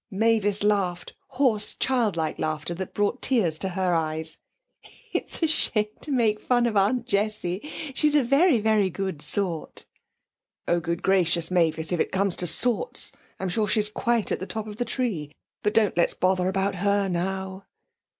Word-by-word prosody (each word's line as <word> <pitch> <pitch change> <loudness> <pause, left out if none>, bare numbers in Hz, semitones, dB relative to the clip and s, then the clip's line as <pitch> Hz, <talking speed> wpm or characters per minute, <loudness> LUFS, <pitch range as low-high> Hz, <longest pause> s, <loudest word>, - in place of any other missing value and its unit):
Mavis 205 -1 +2
laughed 195 -4 0
hoarse, 245 -6 +1
childlike 210 -12 0
laughter 155 +2 -2
that 185 +2 -7
brought 205 +5 0
tears 185 -12 +1
to 190 - -1
her 185 -1 0
eyes. 160 -1 -3 0.7
'It's - - -3
a - - +4
shame 215 -9 +2
to 300 - -4
make 225 -5 +2
fun 245 -1 +1
of 230 -2 -1
Aunt 215 +5 +2
Jessie; 205 -5 -1 0.3
she's 300 +2 +3
a 290 - +4
very, 275 +2 +4
very 215 -2 +2
good 190 -4 -4
sort.' 175 -5 -2 0.8
'Oh, 175 - +2
good 170 0 -4
gracious, 175 -3 +2
Mavis, 160 -2 +1
if 175 - 0
it - - 0
comes 195 -1 +1
to 180 - -1
sorts, 240 - +2 0.3
I'm 190 - -2
sure 210 +4 0
she's 210 +1 +3
quite 235 +1 -1
at - - -1
the 185 - -6
top 220 -1 -4
of 210 -1 -9
the 245 - -1
tree. 215 - -3 0.3
But 210 +1 -1
don't 215 -3 +3
let's 170 - +1
bother 185 0 +1
about 195 +1 0
her 200 +1 +1
now.' 190 +2 -3
200 Hz, 170 wpm, -25 LUFS, 175-225 Hz, 0.8 s, a